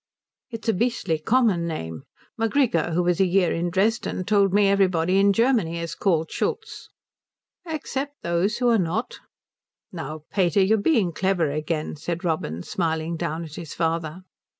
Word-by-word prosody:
"It's 230 -2 -8
a 225 - +3
beastly 200 -7 0
common 205 -3 +2
name. 80 - -5 0.3
Macgrigor, 225 - +1
who 180 - +2
was 175 -1 +1
a 190 - +4
year 180 0 +2
in 170 +1 -1
Dresden, 200 +1 0
told 200 0 +3
me 205 +1 +4
everybody 185 -2 +2
in 200 0 +5
Germany 220 -6 +2
is 170 -1 -4
called 165 -5 0
Schultz." 450 0 -3 0.8
"Except 285 -3 -4
those 170 +5 0
who 245 - +1
are 230 -2 +4
not." 180 +6 -2 0.7
"Now, 155 -2 -6
pater, 190 0 +3
you're 215 +4 +3
being 205 - +2
clever 175 -4 +1
again," 155 +1 -3
said 170 +3 -4
Robin, 90 - -2
smiling 165 -1 -2
down 165 0 -3
at 155 -3 -10
his 160 -1 -8
father. 165 +1 -2
180 Hz, 155 wpm, -24 LUFS, 165-215 Hz, 0.8 s, in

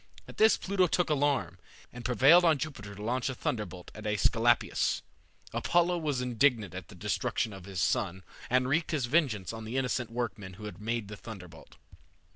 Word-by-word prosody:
At - - -12
this 220 0 +6
Pluto 190 -1 +1
took 175 -1 +1
alarm, 135 - +1 0.3
and 125 0 -8
prevailed 135 +8 +6
on 160 -3 +4
Jupiter 125 -9 -6
to 105 - -8
launch 125 +4 0
a 130 - -4
thunderbolt 105 - -4
at 105 0 -7
Aesculapius. 105 -2 +2 0.5
Apollo 175 0 +2
was 145 -5 -1
indignant 120 -5 +1
at 95 0 -7
the - - -13
destruction 105 +2 -1
of 95 -2 -10
his 95 -2 -5
son, 95 0 0 0.3
and 130 +1 +3
wreaked 160 +5 +1
his 150 -6 0
vengeance 120 - +1
on 115 0 -7
the 115 +4 -4
innocent 125 -2 -1
workmen 110 -5 -4
who 95 - -12
had 105 -2 -8
made 115 -1 -2
the 105 0 -8
thunderbolt. 90 -8 -11
120 Hz, 180 wpm, -30 LUFS, 105-145 Hz, 0.5 s, this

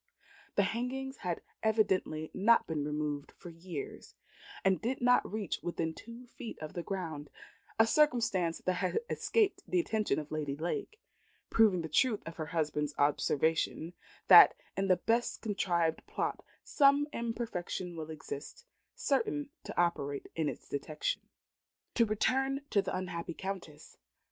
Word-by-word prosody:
The 200 - +4
hangings 260 +5 -3
had 175 -3 -3 0.2
evidently 195 -8 +1
not 230 +4 +4
been 155 -3 -2
removed 150 -1 -3
for 175 - -11
years, 165 -3 -7 0.5
and 190 -1 +3
did 250 +3 -1
not 245 0 +3
reach 210 -4 -2
within 165 -2 -2
two 235 +7 -11
feet 235 -1 -8
of 155 +2 -7
the 175 - -3
ground 165 -6 -5 0.5
a 225 - +6
circumstance 225 - +2
that 185 - +1
had 185 - 0
escaped 430 -3 +1
the 365 - +2
attention 215 - 0
of 150 -1 -5
Lady 150 -3 -2
Lake 175 - -4 0.5
proving 205 -6 +4
the - - -3
truth 215 - +2
of 165 - -8
her 155 -2 -4
husband's 150 -2 -1
observation, 160 +3 +1 0.3
that - - +10 0.2
in 195 0 0
the 185 -1 +4
best 230 +6 0
contrived 175 -6 0
plot - - -2 0.2
some 285 0 +4
imperfection 225 -6 -3
will 160 -1 -6
exist 155 - -7 0.3
certain 295 - 0
to - - -4
operate 145 -5 0
in 160 -3 0
its - - -8
detection. 150 - -3 0.6
To 230 -2 +3
return 270 +6 +1
to 200 - +4
the - - -3
unhappy 170 -2 -4
Countess. 190 -6 -7
185 Hz, 145 wpm, -32 LUFS, 160-230 Hz, 0.6 s, that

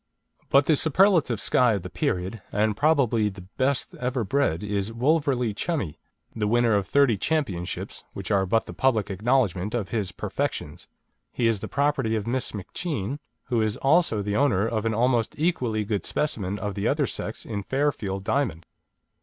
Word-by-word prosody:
But 140 +1 +5
the 155 - +4
superlative 160 - +3
Skye 125 -3 +3
of 100 -4 -2
the 90 - -6
period, 90 +4 -2
and 105 +1 +1
probably 125 -7 +3
the 95 -2 -10
best 130 +8 -1
ever 125 -1 -1
bred, 105 - 0
is 105 0 -2
Wolverley 130 -2 +1
Chummie, 105 - -3 0.4
the 105 -2 0
winner 120 +1 +3
of 100 -2 +1
thirty 140 -5 +3
championships 100 - -2
which - - -6
are 95 -2 +2
but 115 +4 +2
the - - -8
public 110 -7 +1
acknowledgment 105 -1 +1
of 105 -6 -2
his 105 -6 -2
perfections. - - -4 0.4
He 120 - -1
is 115 -3 +2
the - - -5
property 140 -5 +1
of 105 -2 -2
Miss 125 +2 -1
McCheane, 130 - -4 0.2
who 120 -3 0
is 110 -1 0
also 135 - +2
the 100 0 -2
owner 115 -7 +2
of 115 -1 -1
an 110 - 0
almost 120 -1 +1
equally 125 -10 0
good 100 -1 -1
specimen 105 -10 -2
of 105 -1 -3
the 100 +2 -1
other 145 0 +2
sex 110 -2 -4
in 105 -3 -3
Fairfield 105 -6 -1
Diamond. 100 - -1
115 Hz, 170 wpm, -25 LUFS, 100-135 Hz, 0.4 s, But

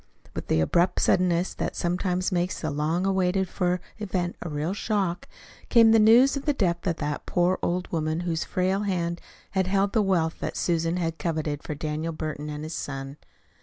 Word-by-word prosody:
With - - -6
the 80 - +2
abrupt 175 - +2
suddenness 180 0 +2
that - - -3
sometimes 180 +1 -1
makes 180 0 -1
the 155 - -2
long 155 +5 0
waited 190 0 +1
for 180 0 0 0.2
event 180 -4 -2
a 175 - -4
real 150 +4 -2
shock, 200 -5 -1 0.4
came 230 -2 +7
the 225 - +6
news 235 +6 +6
of 280 - -4
the 295 - +2
death 175 -4 0
of 170 - +1
the 145 -2 -3
poor 180 +1 +2
old 180 +1 -1
woman 160 0 -1
whose 170 -2 -1
frail 185 +1 0
hand 175 -4 -1 0.3
had 190 -1 +1
held 195 +1 +1
the 220 - +3
wealth 175 -5 +1
that - - -4
Susan 165 0 0
had 165 -2 -2
coveted 155 -3 -2
for 150 - -5
Daniel 155 +2 -3
Burton 155 -1 -5
and 150 0 -5
his 155 +1 -5
son. 135 -1 -5
175 Hz, 190 wpm, -26 LUFS, 160-190 Hz, 0.4 s, came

